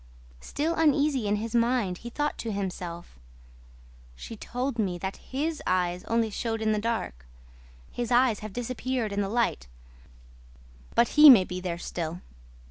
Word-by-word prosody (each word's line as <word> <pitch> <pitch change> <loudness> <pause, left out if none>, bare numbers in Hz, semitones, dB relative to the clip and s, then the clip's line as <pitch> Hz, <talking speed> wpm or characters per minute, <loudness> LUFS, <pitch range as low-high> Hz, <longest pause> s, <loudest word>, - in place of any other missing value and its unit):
Still 305 - -2
uneasy 290 -6 +2
in 205 - +2
his 225 +2 -4
mind, 235 -6 +1
he 235 - -8
thought 295 +4 -2
to 230 - -3
himself: 180 - -5 1.0
"She 225 - -8
told 245 +3 -4
me 185 -5 0
that 190 +2 -5
HIS 300 +4 -3
eyes 180 -1 0
only 230 -1 0
showed 225 +1 -2
in 220 0 +1
the 215 - +1
dark. 210 - -3 0.6
His 240 -1 -3
eyes 245 -3 +3
have 215 0 -7
disappeared 245 -1 -3
in 200 - 0
the 195 - -2
light, 220 - 0 1.3
but 235 - +4
HE 300 0 +9
may 230 -8 +9
be 180 0 -5
there 175 -2 -3
still." 170 0 -5
225 Hz, 155 wpm, -27 LUFS, 185-250 Hz, 1.3 s, HE